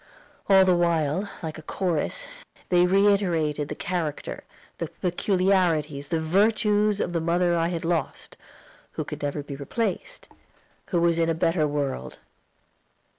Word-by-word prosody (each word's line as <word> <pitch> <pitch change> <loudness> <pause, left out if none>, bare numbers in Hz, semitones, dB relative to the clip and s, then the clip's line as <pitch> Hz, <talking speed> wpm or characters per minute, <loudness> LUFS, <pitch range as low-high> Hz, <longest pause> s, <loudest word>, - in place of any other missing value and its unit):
All 190 -1 +7
the 185 -1 +4
while, 170 +2 +1
like 160 -1 -5
a - - -9
chorus, 180 - -2 0.4
they 180 0 +4
reiterated 180 -7 +2
the - - -4
character, 175 -6 -4 0.4
the 165 - -2
peculiarities, 175 -4 0
the 165 -2 0
virtues 210 +4 +2
of 175 - -2
the 165 - 0
mother 175 +1 +2
I 165 0 +1
had 170 -1 -3
lost, 165 -4 -2 0.6
who - - -3
could - - -7
never 145 0 -2
be 140 -1 -7
replaced 225 - -3 0.6
who 175 - 0
was 170 -1 +2
in 165 0 +2
a 165 - +1
better 165 -1 +1
world. 145 -2 -3
170 Hz, 140 wpm, -25 LUFS, 155-190 Hz, 0.6 s, All